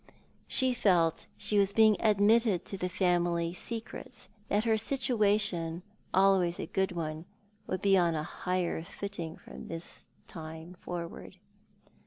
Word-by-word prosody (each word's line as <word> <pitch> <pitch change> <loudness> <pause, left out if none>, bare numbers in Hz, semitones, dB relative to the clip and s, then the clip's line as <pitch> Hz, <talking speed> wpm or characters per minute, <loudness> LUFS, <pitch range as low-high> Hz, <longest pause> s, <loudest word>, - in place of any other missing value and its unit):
She 260 -1 +2
felt 175 -8 +3
that - - -13
she 205 0 +2
was 200 0 +2
being 220 -1 +6
admitted 215 -1 +3
to - - -5
the 180 -1 -2
family 175 -2 +1
secrets, 225 +1 -7 0.2
that 205 +1 +1
her 225 -1 +3
situation, 205 -8 +1 0.3
always 190 -2 +3
a - - -2
good 190 +2 -1
one, 160 -1 -4 0.4
would 185 - -3
be 195 -1 +5
on 170 -2 +2
a 155 - -1
higher 180 0 -2
footing 170 -3 -6
from - - -11
this 165 +1 -9 0.2
time 160 +1 -9
forward. 170 -1 -6
185 Hz, 140 wpm, -30 LUFS, 170-210 Hz, 0.4 s, being